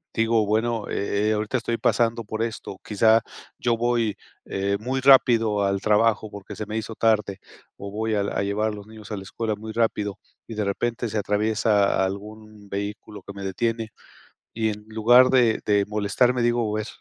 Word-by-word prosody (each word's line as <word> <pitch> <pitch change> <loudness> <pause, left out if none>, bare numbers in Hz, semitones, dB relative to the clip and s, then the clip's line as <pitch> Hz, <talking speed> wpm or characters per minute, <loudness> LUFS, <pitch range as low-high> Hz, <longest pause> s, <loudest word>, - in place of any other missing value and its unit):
digo: 115 -1 +2
"Bueno, 110 +1 0
eh, 100 +2 0
ahorita 110 +4 -1
estoy 115 0 -2
pasando 115 0 +1
por 110 +1 -5
esto. 115 -4 -4
Quizá 110 +2 +4 0.4
yo 120 -1 +1
voy, 115 -3 0 0.3
eh, 100 +1 -1
muy 130 +4 -2
rápido 115 -6 +5
al 100 0 0
trabajo, 110 0 +2
porque 100 0 -9
se 110 - -5
me 110 +1 -4
hizo 110 0 -5
tarde 105 -3 +1 0.4
o 100 0 -8
voy 110 +1 -1
al 100 -1 0
a - - -1
llevar 100 +2 0
a - - -3
los 105 +1 -11
niños 110 -1 -12
a 105 - -3
la 95 - -7
escuela 110 +2 -3
muy 110 +1 -8
rápido 105 -3 0 0.3
y 115 - -7
de 105 - -1
repente 115 +4 -2
se 110 - -3
atraviesa 105 -1 +2
algún 105 +1 -8
vehículo 100 0 -6
que 100 - -7
me 100 0 -8
detiene 115 +3 -2 0.7
y, 110 -1 0
en 105 0 -5
lugar 120 +4 +5
de 120 -4 +4
de 105 -1 +3
molestarme, 105 +4 +1
digo: 120 -2 +1
"A - - -1
ver, 110 - -3
110 Hz, 185 wpm, -24 LUFS, 105-115 Hz, 0.7 s, rápido